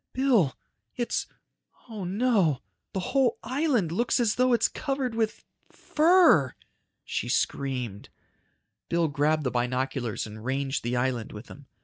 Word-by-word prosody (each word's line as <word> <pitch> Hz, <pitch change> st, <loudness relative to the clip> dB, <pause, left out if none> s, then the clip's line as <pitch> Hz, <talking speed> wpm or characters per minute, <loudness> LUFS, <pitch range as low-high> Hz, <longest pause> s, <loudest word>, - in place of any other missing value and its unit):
"Bill! 245 Hz, -, +2 dB, 0.4 s
It's... 240 Hz, -, -2 dB, 0.6 s
oh 215 Hz, -5 st, -6 dB
no! 195 Hz, -, +1 dB, 0.3 s
The 190 Hz, -, -2 dB
whole 265 Hz, -4 st, +3 dB
island 255 Hz, -, 0 dB
looks 235 Hz, +8 st, +1 dB
as 230 Hz, -3 st, +2 dB
though 255 Hz, 0 st, +2 dB
it's 240 Hz, -, +4 dB
covered 270 Hz, -4 st, -3 dB
with... 225 Hz, -1 st, -2 dB, 0.3 s
fur!" 315 Hz, -, +4 dB, 0.5 s
She -, -, -3 dB
screamed. 125 Hz, -7 st, -2 dB, 0.8 s
Bill 170 Hz, -1 st, +2 dB
grabbed 150 Hz, +2 st, +1 dB
the 125 Hz, -, -1 dB
binoculars 125 Hz, -1 st, -2 dB
and 110 Hz, 0 st, -10 dB
ranged 135 Hz, +2 st, -2 dB
the 120 Hz, +1 st, -1 dB
island 125 Hz, -2 st, -1 dB
with 105 Hz, +3 st, -9 dB
them. 140 Hz, -1 st, -13 dB
165 Hz, 130 wpm, -27 LUFS, -, 0.8 s, it's